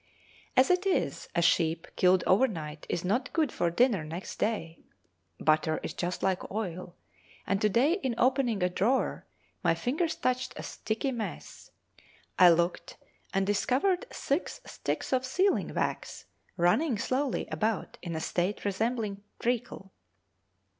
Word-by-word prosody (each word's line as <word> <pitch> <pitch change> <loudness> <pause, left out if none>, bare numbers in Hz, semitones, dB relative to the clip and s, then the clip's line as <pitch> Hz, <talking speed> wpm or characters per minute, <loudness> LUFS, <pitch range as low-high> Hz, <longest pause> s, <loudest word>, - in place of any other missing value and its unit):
As 260 +6 +6
it 365 +2 +2
is, 380 - 0
a 170 - +3
sheep 165 0 +2
killed 185 -1 +4
overnight 165 - +1
is 175 - -2
not 235 +8 0
good 310 -6 +1
for 170 - 0
dinner 205 0 +2
next 165 +4 -7
day; 170 -7 -1 0.6
butter 155 0 +2
is - - -4
just 180 +1 -3
like 190 -1 0
oil, 180 -4 -4 0.5
and 195 0 0
to 210 - +4
day 255 - +3
in 255 -6 -1
opening 250 -5 +2
a - - +4
drawer 225 +9 0 0.4
my - - +3
fingers 315 +6 -1
touched 255 0 -1
a - - -6
sticky 225 +5 -3
mess; 235 -4 -6 0.7
I 180 - +9
looked 170 +1 +1 0.3
and 195 -1 +1
discovered 280 - +1
six 280 +6 -2
sticks - - -3
of 255 0 +2
sealing 370 +10 +1
wax - - -3 0.3
running 215 - +3
slowly 255 +4 -1
about 220 -2 -2
in 170 -2 -5
a - - -1
state 180 +6 -1
resembling 210 0 -1 0.2
treacle. 235 -5 -2
210 Hz, 140 wpm, -29 LUFS, 180-255 Hz, 0.7 s, I